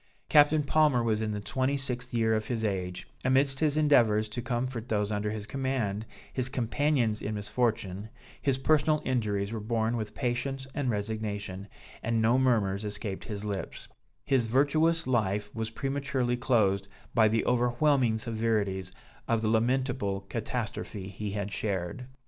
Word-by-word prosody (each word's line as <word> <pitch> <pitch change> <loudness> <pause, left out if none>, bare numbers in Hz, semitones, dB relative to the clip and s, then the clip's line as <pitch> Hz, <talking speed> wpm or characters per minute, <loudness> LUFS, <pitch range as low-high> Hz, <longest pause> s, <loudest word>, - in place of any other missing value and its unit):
Captain 150 0 +6
Palmer 145 -4 +3
was 110 -2 +1
in 110 - -1
the 105 -1 -2
26th 130 +2 -1
year 115 -2 +2
of 110 -1 -1
his 115 -3 -2
age; 90 -4 -2 0.2
amidst 135 +1 +3
his 155 -1 +2
endeavors 115 -8 +4
to 105 +3 -4
comfort 120 0 -3
those 105 -1 0
under 105 0 -1
his 105 -1 -4
command, 115 -5 -2 0.3
his 130 -1 -1
companions 125 -3 +1
in 105 - -3
misfortune, 105 -2 -1 0.3
his 135 -2 +1
personal 155 +2 +2
injuries 105 -5 0
were 115 - -3
borne 110 +1 0
with 110 -3 -4
patience 130 +1 -2
and 140 -4 -1
resignation, 105 -2 -3 0.3
and 115 0 0
no 115 +3 +4
murmurs 110 -6 +2
escaped 105 -1 -5
his 105 -2 -5
lips; 100 -2 -5 0.4
his 130 -4 +2
virtuous 155 +6 +3
life 105 -4 0
was 110 -1 -3
prematurely 135 0 -1
closed 105 -6 +2 0.3
by 110 -1 +5
the 115 +1 +1
overwhelming 125 0 +2
severities 110 -5 -1 0.4
of 115 -1 +1
the 110 - +2
lamentable 120 -3 +1
catastrophe 105 -2 -4
he 105 +2 -5
had 100 0 -3
shared. 100 +4 -3
115 Hz, 150 wpm, -29 LUFS, 105-130 Hz, 0.4 s, Captain